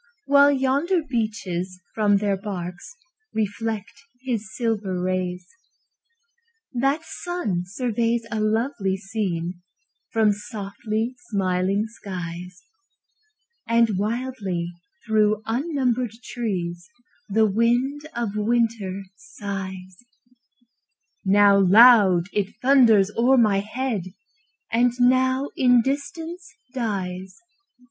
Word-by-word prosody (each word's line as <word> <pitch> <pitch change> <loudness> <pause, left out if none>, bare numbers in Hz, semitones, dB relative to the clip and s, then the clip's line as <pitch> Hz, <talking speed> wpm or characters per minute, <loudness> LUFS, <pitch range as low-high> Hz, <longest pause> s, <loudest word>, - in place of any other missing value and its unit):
While 285 0 +6
yonder 285 +6 +1
beeches 190 -7 -3
from 205 -2 +3
their 200 -1 0
barks 185 - -7 0.4
Reflect 215 +2 -3 0.2
his 225 -6 -3
silver 210 -6 -1
rays. 180 -1 -2 1.3
That 275 +5 +1
sun 215 - -3
surveys 230 +2 -1
a 220 - -1
lovely 215 -2 0
scene 185 -4 -3 0.5
From 220 -2 +3
softly 210 +2 -4 0.2
smiling 195 0 0
skies; 180 -4 -8 1.0
And 230 -4 +3
wildly 210 -6 -2 0.3
through 215 -1 +2
unnumbered 250 -2 -1
trees 180 -8 -4 0.4
The 220 +2 +3
wind 240 +7 +1
of 230 -4 -2
winter 210 -3 0
sighs: 190 - -7 1.3
Now 200 0 +5
loud, 195 -3 +7
it 205 -1 -1
thunders 235 -7 +5
o'er 255 +3 +4
my 210 -5 +4
head, 215 -1 -3 0.7
And 240 +1 +3
now 260 +2 +3
in 245 -2 +4
distance 320 +5 -4 0.2
dies. 190 -6 -4
215 Hz, 90 wpm, -23 LUFS, 190-245 Hz, 1.3 s, loud